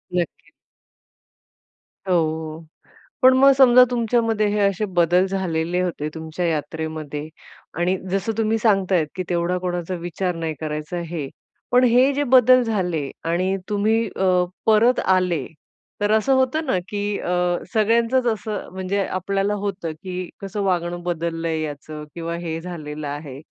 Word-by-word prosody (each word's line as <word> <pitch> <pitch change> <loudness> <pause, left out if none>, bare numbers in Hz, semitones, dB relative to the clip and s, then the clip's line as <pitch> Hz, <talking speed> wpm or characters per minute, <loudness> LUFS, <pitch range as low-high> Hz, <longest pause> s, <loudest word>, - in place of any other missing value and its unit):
नक्कीच. 175 -1 -3 1.6
हो. 160 -2 -1 0.6
पण 255 0 +7
मग 275 +1 +7
समजा 250 -1 +8
तुमच्यामध्ये 230 -2 +1
हे 210 +1 0
असे 200 +1 +1
बदल 175 +2 +4
झालेले 180 -2 -1
होते 160 -4 -2
तुमच्या 160 +2 -4
यात्रेमध्ये 155 -1 -4 0.5
आणि 180 +2 +1
जसं 195 +3 0
तुम्ही 225 0 +1
सांगतायेत 195 -7 +2
की 185 - -2
तेवढा 175 +1 0
कोणाचा 180 0 -3
विचार 175 +1 -2
नाही 165 -1 -3
करायचा, 155 +2 -4
हे. 165 -4 -5 0.4
पण 250 +1 +5
हे 250 +3 +5
जे 290 +1 0
बदल 255 0 +6
झाले 180 -10 -1
आणि 185 +3 0
तुम्ही 220 +2 +1
अ, 185 -1 +3 0.2
परत 225 +3 +4
आले, 180 -6 +1 0.5
तर 205 0 +1
असं 220 +5 +3
होतं 260 +5 +1
ना, 255 - +1
की 205 0 -2
अ, - - -4 0.4
सगळ्यांचच 230 +4 +2
असं 215 -1 -5
म्हणजे 190 +1 -1
आपल्याला 195 +2 -1
होतं 190 -5 -3
की 185 -1 -5
कसं 200 +1 -4
वागणं 175 -2 -1
बदललंय 165 -2 -2
याचं 150 0 -6
किंवा 170 0 -4
हे 165 -1 -4
झालेलं 155 -4 -6
आहे. 145 -2 -7
185 Hz, 140 wpm, -22 LUFS, 165-215 Hz, 1.6 s, समजा